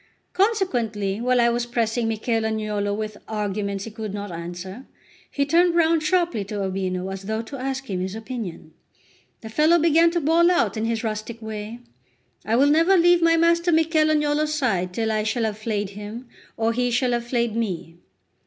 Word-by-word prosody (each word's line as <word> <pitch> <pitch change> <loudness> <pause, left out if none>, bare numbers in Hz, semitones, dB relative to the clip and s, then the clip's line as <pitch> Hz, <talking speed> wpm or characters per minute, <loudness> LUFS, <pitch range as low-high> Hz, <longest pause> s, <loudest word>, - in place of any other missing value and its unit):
Consequently, 240 - 0
while 250 0 +2
I 235 0 +4
was 240 0 -1
pressing 235 -1 0
Michel 225 +1 -1
Agnolo 215 -2 -1
with 215 0 -4
arguments 200 -2 -3
he 225 - -7
could 215 -2 -6
not 205 -1 -5
answer, 175 +7 -7 0.4
he 280 - 0
turned 340 +3 +3
round 330 -1 +3
sharply 340 - +1
to 200 0 -4
Urbino, 185 -1 -2
as 195 0 -6
though 220 +3 -3
to 275 +5 -8
ask 270 +1 -3
him 190 -4 -3
his 185 +2 -3
opinion. 220 -8 -7 0.7
The 220 - -8
fellow 310 +8 +4
began 330 +1 +4
to 345 +1 0
bawl 335 +3 +4
out 360 -6 +2
in 220 0 -2
his 230 0 -1
rustic 220 +1 -4
way: 220 +1 -7 0.6
"I 220 +4 0
will 280 +4 +4
never 330 +5 +4
leave 350 0 +5
my 330 0 +4
master 335 +1 +3
Michel 320 -1 +3
Agnolo's 300 0 +1
side 190 -11 0
till 220 +3 -1
I 215 0 +1
shall 220 +2 -1
have 215 -1 -2
flayed 210 -3 -2
him 210 +5 -8 0.3
or 225 0 +1
he 245 +1 0
shall 245 +1 +1
have 240 0 -1
flayed 235 -3 0
me." 180 -7 -3
230 Hz, 185 wpm, -23 LUFS, 210-300 Hz, 0.7 s, leave